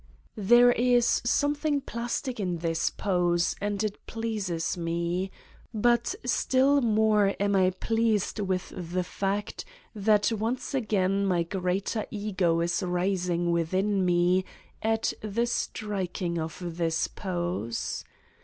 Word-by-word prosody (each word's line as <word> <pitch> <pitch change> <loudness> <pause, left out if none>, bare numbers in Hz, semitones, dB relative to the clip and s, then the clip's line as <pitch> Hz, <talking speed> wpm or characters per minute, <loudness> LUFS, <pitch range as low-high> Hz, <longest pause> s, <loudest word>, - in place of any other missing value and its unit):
There 240 +2 +7
is 245 0 +3
something 290 +3 +1
plastic 240 0 -4
in 180 -4 -1
this 165 0 0
pose 175 -2 +1
and 205 0 -1
it 210 -1 -4
pleases 210 -8 -2
me. 170 +2 -2 0.5
But 235 +2 +2
still 265 +3 +3
more 215 -3 +3
am 200 0 +1
I 185 -1 +4
pleased 220 +2 0
with 190 -2 -2
the 180 0 -2
fact 200 +3 -3 0.3
that 210 +1 +2
once 230 +6 -2
again 200 -5 +1
my 175 -3 +2
greater 190 +4 -2
Ego 190 -5 0
is 170 +2 0
rising 180 -1 0
with 170 +1 0
in 195 0 +2
me 180 +1 +3 0.4
at 225 0 +1
the 215 +3 0
striking 190 -6 -2
of 160 0 -4 0.2
this 165 -1 0
pose. 175 - -3
195 Hz, 120 wpm, -27 LUFS, 175-225 Hz, 0.5 s, There